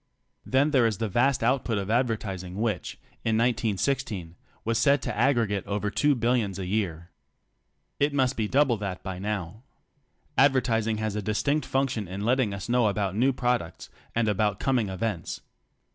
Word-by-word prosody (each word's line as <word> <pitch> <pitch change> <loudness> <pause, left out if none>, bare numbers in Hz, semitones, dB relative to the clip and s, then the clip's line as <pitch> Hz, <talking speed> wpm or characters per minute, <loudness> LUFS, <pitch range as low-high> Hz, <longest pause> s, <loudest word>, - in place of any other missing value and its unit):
Then 140 +4 +3
there 130 -5 +4
is 110 -4 -2
the 115 - -1
vast 120 +5 +2
output 120 -2 +1
of 100 0 -3
advertis 110 -6 0
ing 90 0 -8
which, 110 +1 -2 0.3
in 110 -1 +1
1916, 110 -5 0 0.3
was 115 0 +1
said 140 +4 +4
to 120 -5 -3
aggregate 115 -5 +2
over 105 0 -1
2 145 +3 +3
billions 115 -5 0
a 95 - -4
year. 90 -4 -2 0.9
(It 145 +1 +3
must 135 -2 +1
be 110 -2 -1
double 130 -1 +3
that 100 -3 -5
by 95 -1 -5
now.) 105 0 -4 0.8
Advertising 115 -5 +3
has 110 -1 -2
a 105 - -1
distinct 140 +9 0
function 130 -6 0
in 95 +3 -5
letting 125 -2 +2
us 100 -1 -5
know 120 -1 +3
about 100 -2 -1
new 130 +5 +3
products, 120 -9 -2 0.2
and 115 -1 +2
about 105 -1 +1
coming 125 -6 +1
events. 95 -3 -3
110 Hz, 165 wpm, -27 LUFS, 100-125 Hz, 0.9 s, there